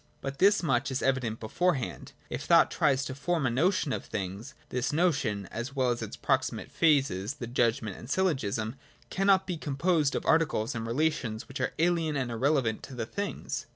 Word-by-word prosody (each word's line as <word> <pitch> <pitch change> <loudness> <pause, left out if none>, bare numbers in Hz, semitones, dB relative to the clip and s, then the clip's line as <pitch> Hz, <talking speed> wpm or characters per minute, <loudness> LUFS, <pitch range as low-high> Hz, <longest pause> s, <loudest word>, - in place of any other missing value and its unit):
But 135 0 -6
this 200 0 +5
much 135 -3 +1
is 130 -1 -2
evident 130 -4 0
beforehand. 140 +4 -1
If - - -4
thought - - +5
tries 135 -1 +2
to 130 - -4
form 155 +2 -1
a 125 - +2
notion 155 +2 +1
of - - -3
things, 100 +8 -5
this 125 0 -1
notion 145 - +1
(as 120 +5 -5
well 130 -2 +2
as 120 - -2
its - - -6
proximate - - -1
phases, 140 - +2
the 135 -5 -6
judgment 115 -4 0
and 120 - -11
syllogism) 130 - 0 0.3
cannot 195 0 +3
be 180 -3 -3
composed 150 0 +1
of - - -2
articles 155 -9 +2
and 115 -1 -4
relations 120 -4 -1
which 135 - -6
are - - -1
alien 165 -2 +1
and 130 -3 -1
irrelevant 125 -1 +1
to 135 - -9
the 115 -2 -3
things. 200 - -4
135 Hz, 185 wpm, -29 LUFS, 115-160 Hz, 0.3 s, this